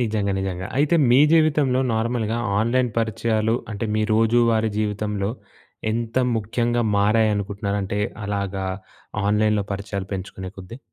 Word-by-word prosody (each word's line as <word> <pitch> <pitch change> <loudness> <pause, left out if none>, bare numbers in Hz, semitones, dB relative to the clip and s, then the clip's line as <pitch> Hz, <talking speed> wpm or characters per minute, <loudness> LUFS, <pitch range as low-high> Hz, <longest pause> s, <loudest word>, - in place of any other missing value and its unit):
నిజంగా 105 -4 0
నిజంగా. 95 -1 -3
అయితే 150 +3 +3 0.2
మీ 125 - +6
జీవితంలో 150 -5 +3
నార్మల్‍గా 115 0 -1 0.2
ఆన్‍లైన్ 125 +1 +1
పరిచయాలు 110 0 0 0.2
అంటే 105 +2 -3
మీ 110 - +1
రోజువారీ 115 0 +3
జీవితంలో 105 -1 -1 0.6
ఎంత 115 0 -3 0.2
ముఖ్యంగా 120 +3 0
మారాయనుకుంటున్నారంటే 100 -1 0 0.3
అలాగా 100 -1 -2 0.6
ఆన్‍లైన్‍లో 105 0 +2
పరిచయాలు 100 -1 -4
పెంచుకునే 95 0 -6
కొద్దీ. 95 +7 -9
110 Hz, 110 wpm, -23 LUFS, 100-115 Hz, 0.6 s, మీ